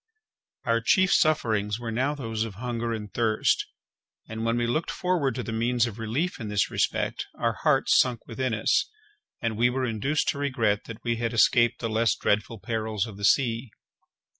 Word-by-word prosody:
Our 115 -1 +2
chief 185 - +3
sufferings 110 -9 +2
were 115 -1 -4
now 130 +6 0
those 115 -5 -3
of 110 -4 -6
hunger 115 +1 -3
and 105 -3 -5
thirst, 110 -2 +1 0.6
and 110 0 -5
when 115 +1 +1
we 120 - +1
looked 155 +8 -1
forward 170 -9 0
to 125 - -3
the 115 - -5
means 120 +1 +1
of 115 -2 -6
relief 135 - -2
in 110 - -5
this 105 -1 0
respect, - - -1
our - - 0
hearts - - +3
sunk 125 -2 +1
within 125 0 -2
us, 110 - +1 0.5
and 115 -2 -1
we 120 +1 +4
were 130 +1 -1
induced 125 +6 -1
to 140 - -2
regret 115 -8 0
that 115 -2 -9
we 115 -1 0
had 115 0 -2
escaped 120 +1 +3
the 115 - -1
less 115 +1 +2
dreadful 105 +2 0
perils 110 -1 -2
of 110 -4 -9
the 100 - -2
sea. 120 0 +2
115 Hz, 190 wpm, -26 LUFS, 110-125 Hz, 0.6 s, we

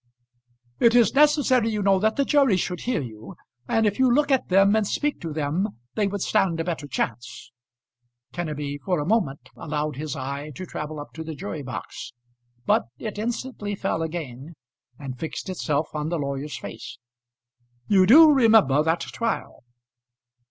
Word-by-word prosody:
"It 235 0 +4
is 240 -2 +5
necessary, 280 -5 +4
you 210 -2 -2
know, 195 -1 +4
that 220 +2 +1
the 280 - +1
jury 275 -10 +3
should 180 -1 -2
hear 240 - -1
you, 110 -3 -10 0.3
and 225 -1 +2
if 205 +2 0
you 260 -1 +4
look 290 +3 +2
at 265 - +1
them 195 +2 +5
and 215 -2 +1
speak 295 +6 -1
to 165 - -5
them, 155 - -2 0.2
they 210 -2 +1
would 200 -1 -3
stand 170 -4 +1
a - - 0
better 165 -4 -4
chance." 120 -1 -4 0.8
Kenneby 150 -4 -4
for 180 -4 0
a 145 - -2
moment 170 -9 -1
allowed 150 -2 -3
his 155 +1 -4
eye 140 +2 -5
to 185 - -6
travel 150 -3 -6
up 145 - -9
to 160 - -6
the 160 -1 -6
jury 165 -3 -6
box, 130 -2 -7 0.5
but - - +2
it 210 -2 -6
instantly 225 -2 -3
fell 195 -4 -2
again, 160 -2 -6 0.4
and 130 -3 -7
fixed 160 +3 -5
itself 155 -4 -1
on 150 0 -3
the 170 - -1
lawyer's 140 0 -4
face. - - -9 0.9
"You 190 -2 +4
do 310 +7 +9
remember 220 - +5
that 160 +2 0
trial?" 230 -1 -4
175 Hz, 170 wpm, -24 LUFS, 150-220 Hz, 0.9 s, do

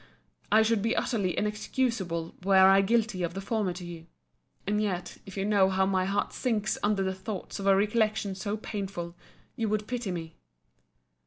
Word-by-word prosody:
I 220 +1 +6
should 220 -1 +2
be 225 +3 +1
utterly 200 -7 0
inexcusable 210 -6 -1
were 195 +1 +3
I 195 0 +6
guilty 215 -2 +1
of 170 0 -2
the - - -3
former 205 -1 -1
to 180 0 -8
you. 165 -1 -9 0.6
And 210 +1 +1
yet, 180 -4 -3
if 195 - -9
you 195 - 0
know 200 -2 +4
how 190 0 +2
my 190 -1 +1
heart 200 +1 -1
sinks 225 -5 -1
under 205 -2 +1
the 190 0 -1
thoughts 190 +1 -6
of 200 - -3
a 195 - +6
recollection 215 0 +1
so 205 +2 -3
painful, 195 -5 -5 0.4
you 225 -2 -1
would 215 0 0
pity 245 -3 -3
me. 165 -3 -5
200 Hz, 180 wpm, -28 LUFS, 190-215 Hz, 0.6 s, I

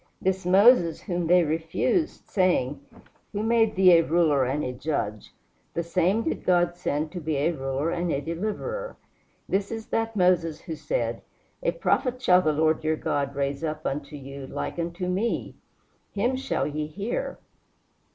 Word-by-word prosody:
This 190 -1 -1
Moses, 190 -3 +5
whom 175 -4 -2
they 180 +1 +5
refused, 165 - -1
saying, 145 -8 +1 0.5
"Who 205 +1 -2
made 225 -1 +3
thee 185 -3 +7
a - - +2
ruler 155 -5 +3
and 140 +4 -1
a 125 - -3
judge?" 125 -6 -3 0.4
the 170 - 0
same 180 +6 +1
did - - -2
God 175 -1 +2
send 155 -3 -2
to 180 - -5
be 155 0 -1
a 150 +5 +2
ruler 135 +1 -2
and 175 -1 -1
a 140 - 0
deliverer. 215 - -4 0.5
"This 195 +1 -1
is 225 -1 -5
that 225 0 -1
Moses 180 -4 +2
who 165 -3 -6
said, - - -2 0.4
A - - +1
Prophet 255 - 0
shall 180 -7 +5
the 155 - +2
Lord 155 +1 +1
your 155 0 +1
God 140 -2 -2
raise 140 +2 -2
up 155 -1 -3
unto 145 +1 -3
you 140 -1 -8
like - - -4
unto 170 +2 -3
me: 195 +6 -1 0.6
him 240 +6 0
shall 265 - -1
ye 150 +1 -3
hear." 200 +9 -4
170 Hz, 165 wpm, -26 LUFS, 150-195 Hz, 0.6 s, thee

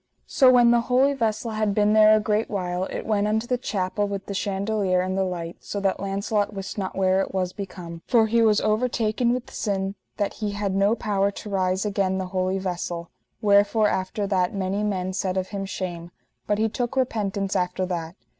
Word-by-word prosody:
So 260 -3 +5
when 240 -1 +6
the 240 0 +4
holy 265 +3 +4
vessel 225 -3 -1
had 215 -2 0
been 210 0 +3
there 215 0 +7
a - - +3
great 215 +1 0
while 180 -2 -2
it - - -5
went 210 -1 +1
unto 220 +2 0
the 250 - 0
chapel 205 -2 -1
with 200 -1 -5
the 200 - -5
chandelier 195 -1 0
and 185 +1 -2
the 195 - +1
light, 175 -2 -4
so 205 - -5
that 195 -1 0
Launcelot 200 +2 -1
wist 195 -1 -5
not 190 -2 -4
where 190 0 +3
it 195 - -4
was 185 -1 -1
become; 175 -4 -7
for 230 -2 +4
he 230 +1 +2
was 215 -2 +4
overtaken 225 +1 +1
with 250 0 -3
sin 195 -2 -2 0.2
that 205 -1 -1
he 205 -1 -1
had 200 -1 -2
no 200 +3 +3
power 200 -3 0
to 210 +1 -8
rise 190 0 0
again 195 -2 0
the 190 - -2
holy 185 0 0
vessel; 175 -2 -4 0.3
wherefore 205 +1 +4
after 190 +2 -2
that 190 -1 0
many 195 +1 -1
men 190 -3 -1
said 185 0 -1
of 185 0 -2
him 200 -1 -4
shame, 175 -3 -5 0.4
but 205 - +1
he 220 +1 +2
took 240 +3 -3
repentance 205 -6 -1
after 180 +1 0
that. 170 -2 -4
200 Hz, 205 wpm, -24 LUFS, 185-215 Hz, 0.4 s, there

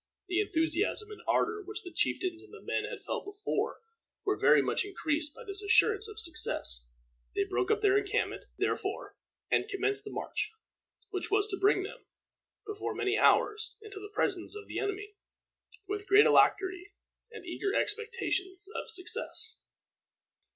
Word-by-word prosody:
The 365 +1 +1
enthusiasm 390 +3 +1
and 420 - -9
ardor 435 -1 +1
which 415 +2 -7
the 355 - -9
chieftains 360 -2 0
and 415 - -17
the 430 - -11
men - - -1
had - - -7
felt - - -3
before 405 +4 -3 0.4
were 400 0 +2
very - - +5
much - - +1
increased 315 -6 -1
by - - -10
this 395 0 -2
assurance 410 +1 +4
of 430 0 -8
success. 300 - +1 0.5
They - - +2
broke 125 +1 -1
up - - +2
their 410 -1 +5
encampment, 400 -1 -2
therefore, - - -2 0.4
and - - +2
commenced 405 +1 +1
the - - -7
march, 425 - -3 0.6
which 375 -2 -3
was 410 0 +3
to 390 - -1
bring 395 -1 +4
them, 395 - -8 0.6
before 420 -1 -4
many 390 +1 +1
hours, 430 0 +3
into 420 -2 -10
the 415 +1 -9
presence 400 -3 -1
of 420 0 -8
the - - -3
enemy, 410 0 -3 0.7
with 410 0 -4
great 405 +2 +7
alacrity 375 0 +3 0.4
and 435 -5 -10
eager 395 +3 -2
expectations 415 -4 -1
of - - -4
success. 440 +2 0
405 Hz, 160 wpm, -31 LUFS, 375-420 Hz, 0.7 s, great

